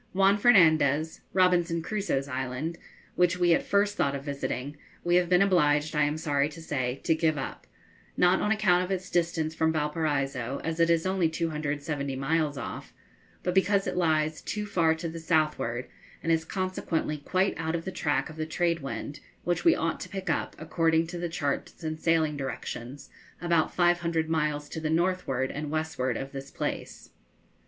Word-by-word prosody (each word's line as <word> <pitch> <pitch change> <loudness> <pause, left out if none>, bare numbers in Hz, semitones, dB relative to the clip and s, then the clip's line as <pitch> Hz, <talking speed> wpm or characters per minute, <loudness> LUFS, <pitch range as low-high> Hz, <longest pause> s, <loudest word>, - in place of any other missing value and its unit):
Juan 195 +2 +4
Fernandez 160 - +4
(Robinson 175 -3 +2
Crusoe's 195 -10 -1
Island), 130 +5 -3 0.3
which 180 0 +2
we 175 -1 +4
at - - +3
first 205 +1 +1
thought 140 -6 +1
of 140 - -5
visiting, 140 -1 -4 0.3
we 175 - +1
have 175 -1 +2
been 180 +1 +5
obliged, 155 -5 +2
I 150 -1 +4
am 150 +1 -1
sorry 145 -2 +1
to 155 - -11
say, 135 -5 -2
to 160 - +3
give 160 -1 +1
up, 135 - -6 0.5
not 180 +1 +4
on 210 - +1
account 190 -5 +3
of 180 - -5
its 185 -1 -3
distance 165 -2 0
from 160 0 +1
Valparaiso, 145 -4 -1
as 165 0 -3
it 165 0 +4
is 165 0 +2
only 185 -3 +2
270 150 -3 -2
miles 150 +2 0
off, 115 - -7 0.5
but 180 - 0
because 195 +1 +3
it - - -2
lies 155 -3 +1
too 210 0 -3
far 165 -5 +2
to 165 +1 -4
the 165 0 -6
southward, 155 -7 0 0.4
and 165 - +1
is 160 0 +2
consequently 185 -5 -2
quite 185 +6 0
out 160 0 -2
of 165 - -4
the 190 - -3
track 145 -6 0
of 160 - -11
the 155 0 -3
trade 170 +1 0
wind, 140 +1 -5 0.2
which 175 0 0
we 335 -1 +6
ought 165 0 -1
to - - -7
pick 195 -1 -3
up, - - -2
according 165 0 +1
to 170 +1 -6
the 175 0 -2
charts 145 +1 -3
and 155 0 -3
sailing 160 -2 +2
directions, 135 -1 -6 0.3
about 170 -2 +1
500 170 -2 +2
miles 150 -2 0
to - - -5
the 155 -1 -2
northward 160 -6 0
and 150 0 -4
westward 155 -6 -1
of 135 0 -5
this 135 0 -7
place. - - -5
160 Hz, 180 wpm, -28 LUFS, 145-175 Hz, 0.5 s, we